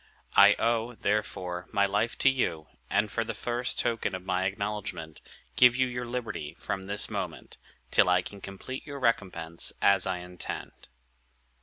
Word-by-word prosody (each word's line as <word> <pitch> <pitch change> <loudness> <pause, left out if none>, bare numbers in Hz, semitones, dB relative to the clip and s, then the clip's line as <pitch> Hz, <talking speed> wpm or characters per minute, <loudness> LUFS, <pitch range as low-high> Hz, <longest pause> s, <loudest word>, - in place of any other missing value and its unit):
I 100 +1 +8
owe, 115 +1 0
therefore, 95 -5 -2
my 100 -2 +3
life 105 +4 0
to - - +9
you; 85 -12 -1 0.2
and, - - +1
for - - 0
the - - -5
first 120 +1 -2
token 115 -4 0
of 95 0 -7
my 95 0 0
acknowledgment, 95 -5 -4 0.3
give 125 - +7
you 130 0 +3
your 125 -1 -4
liberty 115 -11 -4
from 95 0 -4
this 100 +1 +1
moment, - - -5 0.3
till - - +5
I 90 - +4
can 100 -1 -9
complete 100 +8 -7
your 140 -1 -7
recompense, 90 -9 -1
as 100 -1 +4
I 95 -1 0
intend." 90 -1 -7
100 Hz, 160 wpm, -29 LUFS, 90-120 Hz, 0.3 s, to